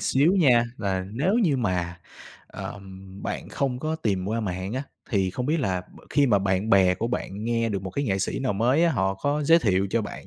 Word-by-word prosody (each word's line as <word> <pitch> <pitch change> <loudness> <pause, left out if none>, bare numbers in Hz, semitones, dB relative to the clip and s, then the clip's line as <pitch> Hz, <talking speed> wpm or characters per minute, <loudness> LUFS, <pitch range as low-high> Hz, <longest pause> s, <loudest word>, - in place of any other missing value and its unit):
xíu 145 +7 +3
nha, 125 -7 +5
là 95 -3 -2
nếu 155 - +1
như 180 - +3
mà, 90 -6 -2 0.5
ờm, 95 -1 -9
bạn - - -4
không 130 -3 -2
có 155 +3 -2
tìm 100 -11 -1
qua 115 +1 -1
mạng 95 -1 -3
á, 130 +2 -2 0.3
thì 95 -4 +1
không 125 +6 -3
biết 155 +1 +1
là 95 -6 0
b 90 - -18
khi 140 0 +3
mà 105 -4 +4
bạn 95 +3 0
bè 95 -2 +5
của 115 +5 -2
bạn 105 -3 -4
nghe 115 -1 0
được 100 -3 -3
một 95 - -5
cái 140 - -2
nghệ 95 -6 0
sĩ 95 - -2
nào 130 -5 0
mới 125 +11 +2
á, 165 - +3
họ 95 0 0
có 145 +9 -1
giới 165 +3 +6
thiệu 100 - +1
cho 115 +1 +1
bạn 105 - -8
110 Hz, 235 wpm, -25 LUFS, 95-135 Hz, 0.5 s, giới